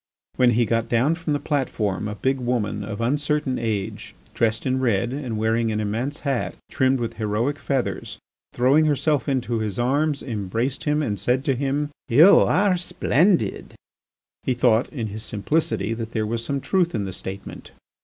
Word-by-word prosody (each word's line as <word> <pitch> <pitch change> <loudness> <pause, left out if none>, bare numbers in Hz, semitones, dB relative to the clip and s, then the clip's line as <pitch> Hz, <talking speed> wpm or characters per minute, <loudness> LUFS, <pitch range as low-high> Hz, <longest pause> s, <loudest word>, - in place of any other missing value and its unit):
When 125 -1 +4
he 120 - +4
got 115 +1 0
down 125 +7 +3
from 165 -2 -2
the 145 - 0
platform 110 - -1
a 105 - -4
big 130 +5 0
woman 120 -4 -1
of 105 +1 -5
uncertain 145 +2 0
age, 110 -4 -3 0.2
dressed 115 -1 0
in 130 0 +1
red, 120 -1 +1
and 130 -6 -4
wearing 110 +1 +1
an 105 - -1
immense 115 +8 -2
hat 135 -4 -1 0.2
trimmed 130 0 +2
with 115 -1 -4
heroic 115 +6 -1
feathers, 135 -3 -2 0.3
throwing 135 +6 +3
herself 145 -3 +1
into 120 -4 0
his 105 -3 -3
arms, 140 +4 +1
embraced 115 +3 -3
him, 150 0 +1
and 105 -7 -2
said 125 +7 0
to 135 - +2
him: 140 +3 -1 0.2
"You 160 +12 +7
are 190 -1 +3
splendid!" 175 - +1 0.7
He 130 - -1
thought 115 0 +3
in 125 -7 -4
his 105 +2 -7
simplicity 110 -2 -1
that 115 0 -6
there 110 -2 0
was 115 +1 -2
some 140 +3 -2
truth 175 -4 +1
in 105 -3 -1
the 95 - -5
statement. 95 +2 -8
125 Hz, 175 wpm, -23 LUFS, 110-145 Hz, 0.7 s, You